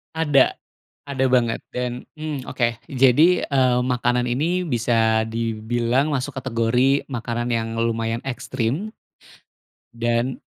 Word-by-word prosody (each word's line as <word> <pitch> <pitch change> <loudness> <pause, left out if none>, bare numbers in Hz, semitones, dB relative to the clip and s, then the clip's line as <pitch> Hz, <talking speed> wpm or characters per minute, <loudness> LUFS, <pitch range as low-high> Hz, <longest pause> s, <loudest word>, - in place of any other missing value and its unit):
Ada, 150 -4 +3 0.6
ada 135 -1 0
banget. 125 -3 +2 0.2
Dan, 125 0 -3
mmm, 155 -4 -5
oke, 120 -2 -1
jadi, 135 +7 +4
eee, 130 -3 +3
makanan 125 -1 0
ini 165 +9 0
bisa 115 -4 +2
dibilang 115 +5 -1
masuk 130 0 -3
kategori 125 +2 +1
makanan 120 -1 -3
yang 115 -1 -1
lumayan 115 0 -1
ekstrim 135 - -3 1.0
dan, 120 +2 -1
125 Hz, 110 wpm, -22 LUFS, 115-135 Hz, 1.0 s, jadi